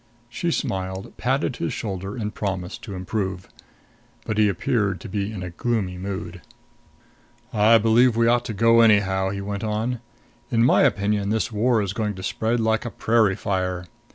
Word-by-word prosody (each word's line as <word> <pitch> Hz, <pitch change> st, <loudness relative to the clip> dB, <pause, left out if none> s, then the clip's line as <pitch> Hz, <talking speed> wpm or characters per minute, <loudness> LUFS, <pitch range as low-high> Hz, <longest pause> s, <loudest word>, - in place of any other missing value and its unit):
She 170 Hz, +8 st, -2 dB
smiled, 95 Hz, -, -3 dB
patted 130 Hz, +1 st, 0 dB
his 85 Hz, -, -2 dB
shoulder 95 Hz, -1 st, -4 dB
and 105 Hz, -2 st, -3 dB
promised 95 Hz, -3 st, -4 dB
to 100 Hz, -4 st, -6 dB
improve. 95 Hz, 0 st, -3 dB, 0.8 s
But 110 Hz, 0 st, -1 dB
he 105 Hz, -1 st, +5 dB
appeared 100 Hz, 0 st, 0 dB
to -, -, -7 dB
be 100 Hz, +1 st, -2 dB
in 100 Hz, -4 st, -6 dB
a 90 Hz, -, -6 dB
gloomy 95 Hz, -2 st, -2 dB
mood. 95 Hz, 0 st, -5 dB, 1.1 s
"I 110 Hz, +1 st, +6 dB
believe 115 Hz, +2 st, +4 dB
we 115 Hz, -, +4 dB
ought 120 Hz, +1 st, +3 dB
to 115 Hz, -, -4 dB
go, 115 Hz, +2 st, +5 dB
anyhow," 95 Hz, -4 st, +3 dB
he 100 Hz, 0 st, -4 dB
went 100 Hz, +1 st, -4 dB
on. 110 Hz, +3 st, -1 dB, 0.5 s
"In 115 Hz, -2 st, +3 dB
my 130 Hz, -, +5 dB
opinion 105 Hz, -5 st, +1 dB
this 110 Hz, +2 st, 0 dB
war 110 Hz, +1 st, +2 dB
is 100 Hz, -1 st, -3 dB
going 105 Hz, -2 st, -2 dB
to 95 Hz, -, -8 dB
spread 115 Hz, +5 st, -1 dB
like 110 Hz, -1 st, +1 dB
a 120 Hz, -, -4 dB
prairie 110 Hz, -4 st, +2 dB
fire. 90 Hz, -2 st, -2 dB
105 Hz, 175 wpm, -23 LUFS, 95-115 Hz, 1.1 s, I